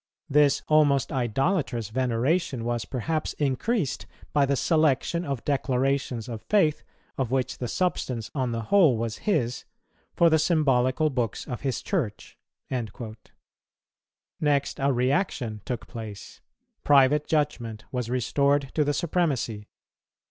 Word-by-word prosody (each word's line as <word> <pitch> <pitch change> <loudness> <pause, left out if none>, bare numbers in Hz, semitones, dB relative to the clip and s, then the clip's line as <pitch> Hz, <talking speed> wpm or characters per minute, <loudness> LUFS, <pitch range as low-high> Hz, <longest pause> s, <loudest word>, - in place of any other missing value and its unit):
This 145 -1 +4
almost 145 -4 +3
idolatrous 130 - 0
veneration 130 +3 0
was 120 -1 -1
perhaps 155 +5 -2
increased 150 - -1 0.3
by 140 -2 +3
the 140 - +2
selection 155 +2 +2
of 140 -7 -4
declarations 135 -3 0
of 115 -3 -6
faith, 170 -8 +2 0.4
of 130 -4 0
which 130 0 -1
the 125 - -2
substance 125 -7 -2
on 130 -4 -1
the 115 0 -3
whole 165 - +6
was 115 -1 -3
his, 125 - 0 0.5
for 170 -1 +5
the 160 - +4
symbolical 150 -2 +2
books 120 -6 -2
of 125 - -5
his 135 -3 -2
Church."[193:1] 115 - -5 1.2
Next 145 -2 0
a 140 0 +2
reaction 125 - 0
took 125 -2 -4
place; 110 -4 -9 0.4
private 145 +1 +4
judgment 120 -8 -1
was 125 -3 -3
restored 140 +3 +1
to 155 - +2
the 145 0 0
supremacy. 140 - -1
135 Hz, 125 wpm, -26 LUFS, 120-150 Hz, 1.2 s, whole